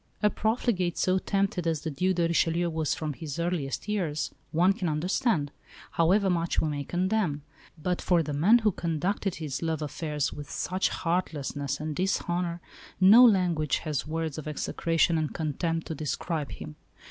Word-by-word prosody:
A 210 - +4
profligate 215 -6 0
so 185 0 +2
tempted 195 -3 0
as 160 -3 0
the 160 - -3
Duc 185 +6 0
de 170 - +1
Richelieu 170 +1 +1
was 160 -2 0
from 155 -2 -3
his 150 0 -6
earliest 170 -3 -2
years, 175 -8 -1 0.2
one 175 +4 +4
can 190 -5 -2
understand, 155 - 0 0.4
however 190 +5 +3
much 170 -2 0
we - - +1
may 145 -1 -3
condemn; 180 -3 0 0.3
but 180 +3 -2
for 175 -2 +3
the 150 -1 -4
man 180 +12 +5
who 215 -3 +2
conducted 175 +3 -2
his 150 -5 -4
love 160 -2 -1
affairs 150 0 -2
with 145 -1 -8
such 185 +1 -1
heartlessness 145 -5 -2
and 155 0 -4
dishonour 175 -1 -1 0.4
no 205 +6 +8
language 180 - +3
has 150 -2 -2
words 160 -1 -3
of 155 - -8
execration 165 +2 +1
and 155 -2 -3
contempt 165 +1 -2
to - - -4
describe 155 +1 -3
him. 155 0 -9
165 Hz, 165 wpm, -28 LUFS, 155-185 Hz, 0.4 s, no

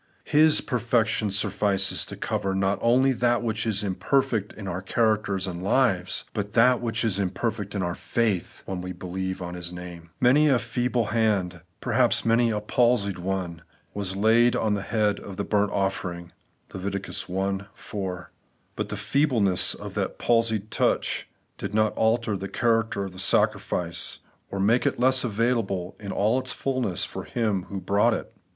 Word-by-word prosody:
His 155 +1 +5
perfection 115 -4 0
suflfices 100 -1 0
to - - -7
cover 95 0 -2
not 95 +1 +1
only 130 +3 +4
that 120 -1 +1
which 110 -1 -1
is 105 -1 0
im 100 -2 -1
perfect 115 -2 0
in 100 -2 -9
our 90 0 -3
characters 105 -1 0
and 90 -2 -5
lives, 95 -3 +1
but 100 -1 -4
that 125 +1 +4
which 115 -1 -1
is 100 -3 +1
imperfect 100 +2 -2
in 95 - -1
our 85 0 -1
faith, 105 -2 -2
when 95 -2 -4
we 90 0 -5
believe 95 +1 -4
on 90 0 -6
His 90 -1 -6
name. 90 -1 -9
Many 135 +5 +5
a 135 - +4
feeble 120 0 -1
hand, 100 -7 +1
— - - -44
^perhaps - - +2
many 115 +1 +3
a 105 -2 0
palsied 105 -3 +1
one, 90 -3 -3 0.2
— - - -38
^was 100 -1 -3
laid 115 +3 +4
on 110 -2 +1
the 100 - -1
head 105 -1 0
of 100 - -9
the 100 - -2
bumt 105 -1 +1
ofifering 90 -3 -2 0.4
(Lev. 100 +1 -3 0.7
i - - -12
4); 90 -3 -6 0.4
but - - -3
the - - -4
feebleness 120 -10 +2
of - - -8
that - - -2
palsied 110 -3 +1
touch - - 0 0.3
did 105 - -4
not 110 -1 +2
alter 110 -1 +1
the 95 0 -5
character 115 -4 +1
of 95 - -5
the 95 - -10
sacrifice, 85 -2 +1 0.3
or 100 - -4
make 110 +6 +3
it - - -1
less 130 +1 +4
available 110 -5 -1
in 100 -2 -6
all 110 +6 +2
its 130 -1 -3
fulness 130 -9 -1
for - - -7
him 105 -6 -1
who 100 - -4
brought 105 +5 +2
it. - - -7
105 Hz, 175 wpm, -25 LUFS, 95-115 Hz, 0.7 s, His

